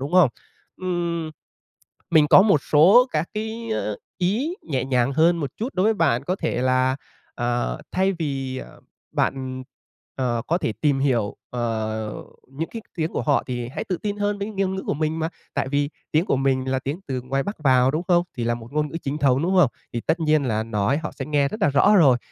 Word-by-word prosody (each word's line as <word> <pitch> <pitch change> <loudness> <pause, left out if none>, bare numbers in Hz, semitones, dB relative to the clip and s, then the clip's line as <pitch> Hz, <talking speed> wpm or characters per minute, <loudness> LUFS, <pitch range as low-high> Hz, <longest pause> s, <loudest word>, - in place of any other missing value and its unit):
đúng 140 +5 -5
không? 180 -6 +6 0.5
Ừm, 170 -3 -2 0.8
mình 155 -3 +5
có 185 - +8
một 195 -8 +4
số 190 - +6
các 155 +2 0
cái 220 +2 -4 0.5
ý 220 - 0
nhẹ 135 -6 -2
nhàng 130 0 +1
hơn 165 +4 +4
một 145 -5 -3
chút 235 +5 -4
đối 185 - +1
với 220 +1 +3
bạn, 125 - +1
có 180 +5 -1
thể 125 - -2
là, 130 0 +2 0.4
ờ, 120 - -1
thay 190 +1 +2
vì, 135 -6 -3
ờ, - - -11 0.3
bạn, 130 -1 -1 0.5
ờ, 120 -3 -1
có 170 - +1
thể 115 - -1
tìm 145 -3 +2
hiểu, 120 -7 0
ờ, 110 -2 -2 0.3
những 145 +5 -5
cái 225 - -6
tiếng 160 -1 -1
của - - -1
họ 145 -2 +2
thì 120 -2 -4
hãy 130 - -5
tự 185 - -2
tin 205 +3 -3
hơn 205 0 -1
với 200 +1 -3
ngôn 195 -2 -1
ngữ 190 - -4
của - - 0
mình 155 +2 -1
mà 160 0 -1 0.3
tại - - -1
vì 145 +1 0 0.2
tiếng 155 +3 +3
của - - +2
mình 130 -1 +1
là 130 - +1
tiếng 140 +6 -4
từ 130 -2 -2
ngoài 135 +2 -1
Bắc 205 +6 -5
vào, 130 -3 +4
đúng 155 +4 -1
không? 175 -1 +4
Thì 120 - -2
là 120 0 +1
một 120 +2 -10
ngôn 150 0 0
ngữ 155 - -6
chính 140 +2 -3
thống, 135 -2 +3
đúng 185 +3 +1
không? 140 - +4 0.2
Thì 120 - -2
tất 160 +7 0
nhiên 155 -2 +2
là 110 -3 0
nói 110 +4 0
họ 160 - -4
sẽ - - -6
nghe 145 -2 +2
rất 215 - -5
là - - +5
rõ 145 +10 +5
rồi, 140 -9 +6
145 Hz, 220 wpm, -23 LUFS, 130-175 Hz, 0.8 s, có